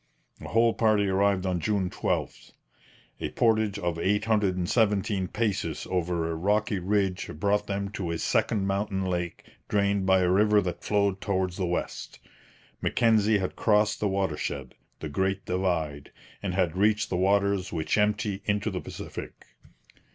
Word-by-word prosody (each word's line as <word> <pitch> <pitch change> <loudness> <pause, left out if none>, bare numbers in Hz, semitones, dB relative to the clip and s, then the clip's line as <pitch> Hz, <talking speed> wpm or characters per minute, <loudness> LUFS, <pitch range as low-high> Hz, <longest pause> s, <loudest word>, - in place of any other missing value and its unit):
The - - -8
whole 115 0 +3
party 110 -3 +2
arrived 95 0 +2
on 90 -2 0
June 95 +2 0
12. - - -3 0.7
A - - -3
portage 110 -3 +1
of 85 -4 -2
817 105 0 +1
paces 105 -1 -2
over 85 -2 0
a - - -2
rocky 105 +5 0
ridge 95 0 0
brought 105 +5 0
them 100 0 -2
to 100 -5 -4
a 85 - -1
second 100 +4 +1
mountain 95 -1 -1
lake 90 -2 -3 0.3
drained 100 -1 +1
by 95 0 +5
a 90 0 +2
river 105 +2 +4
that 90 -2 -4
flowed 100 -2 +1
towards 95 -2 -1
the 95 -3 -1
west. 90 - -4 0.6
Mackenzie 110 -2 +3
had 95 -2 -3
crossed 105 -1 +2
the 105 - +1
watershed, 75 -8 -2 0.3
the 80 - -3
Great 95 +6 -1
Divide, 85 -6 -2 0.3
and 90 -3 -3
had 90 -3 +1
reached 105 +2 +2
the - - +1
waters 100 0 +1
which 80 -1 -1
empty 105 -1 0
into 105 +1 0
the 90 - -4
Pacific. - - -8
100 Hz, 150 wpm, -27 LUFS, 90-105 Hz, 0.7 s, by